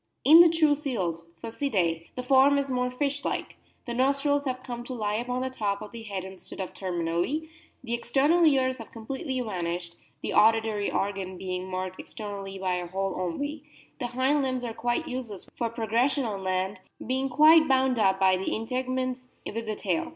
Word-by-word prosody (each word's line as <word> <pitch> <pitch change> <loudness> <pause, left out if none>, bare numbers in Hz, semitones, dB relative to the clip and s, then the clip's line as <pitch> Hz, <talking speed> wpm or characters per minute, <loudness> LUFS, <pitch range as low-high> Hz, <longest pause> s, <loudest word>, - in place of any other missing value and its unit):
In 320 +4 +10
the 345 - +8
true 315 -2 +4
seals 190 - -3 0.2
(Phocidae) 190 - -1
the 250 - -4
form 270 +2 +5
is 280 -1 -1
more 250 0 +1
fish 285 +2 -2
like; - - -3 0.3
the 240 - -4
nostrils 280 +3 +2
have 255 -1 -2
come 240 -2 -5
to 255 - -5
lie 210 -3 -1
upon 250 +2 -2
the 260 - -3
top 200 -5 -1
of 210 - -9
the 235 - -8
head 200 -4 -5
instead 190 0 -10
of 190 - -4
terminally; 180 - -2 0.3
the 235 -2 -3
external 275 +8 +3
ears 260 -4 +3
have 225 - -9
completely 260 +4 -4
vanished, 175 -5 -3 0.3
the - - -2
auditory 220 -1 +3
organ 195 -2 -2
being 185 0 -4
marked 185 0 -4
externally 200 -2 -7
by 185 -1 -1
a 175 -1 -4
hole 195 +1 -2
only; 285 - -3 0.4
the 245 - -2
hind 260 +4 +1
limbs 255 -2 -1
are 235 -2 -3
quite 240 +8 -1
useless 240 -7 -6
for 235 -2 -1
progression 235 +4 +1
on 200 -4 -4
land, 185 +1 -1 0.3
being 265 +2 0
quite 310 +4 +7
bound 260 -2 +3
up 195 -2 +3
by 190 -1 +5
integuments 255 +5 -2 0.2
with 230 +1 -4
the 215 - -2
tail. 330 +7 -1
235 Hz, 180 wpm, -27 LUFS, 195-265 Hz, 0.4 s, In